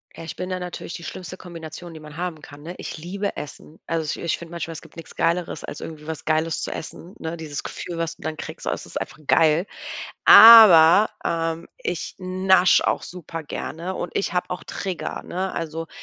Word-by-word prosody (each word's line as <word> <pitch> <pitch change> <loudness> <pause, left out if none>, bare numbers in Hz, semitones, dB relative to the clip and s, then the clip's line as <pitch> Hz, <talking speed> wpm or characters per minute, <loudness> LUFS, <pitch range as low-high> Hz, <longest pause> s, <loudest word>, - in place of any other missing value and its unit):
Ja, - - -9
ich 160 - -7
bin 180 - -5
da 185 0 -2
natürlich 180 -1 -6
die 170 - -9
schlimmste 185 +1 -7
Kombination, 170 -1 -9
die 160 - -10
man 150 0 -12
haben 175 -3 -4
kann, 145 +1 -13
ne? 170 +3 -6
Ich - - -6
liebe 195 +6 -4
Essen. 150 +2 -9
Also 160 -2 -2
ich - - -6
ich 170 - 0
finde 170 0 -10
manchmal, 170 -1 -5
es 160 - -8
gibt - - -17
nix 165 - -11
Geileres, 170 +1 -1
als - - -7
irgendwie 155 -1 -9
was 160 -2 -6
Geiles 155 +1 0
zu - - -3
essen, 170 +3 -8
ne? 165 +1 -5
Dieses 150 -3 -5
Gefühl, 175 -2 -6
was 165 -1 -2
du - - -16
dann 160 0 -3
kriegst. 155 - -8
Also - - 0
es - - -10
ist - - -6
einfach - - -7
geil. 165 +3 +4 0.6
Aber, 215 -4 +10
ähm, 165 0 -2
ich 175 - -4
nasche 185 -1 +3
auch - - 0
supergerne 165 +1 -6
und 175 - -4
ich 190 - -1
habe 180 - -1
auch 180 - -5
Trigger, 190 -3 -5
ne? 185 +2 -3
Also, 165 0 -4
165 Hz, 210 wpm, -23 LUFS, 160-180 Hz, 0.6 s, Aber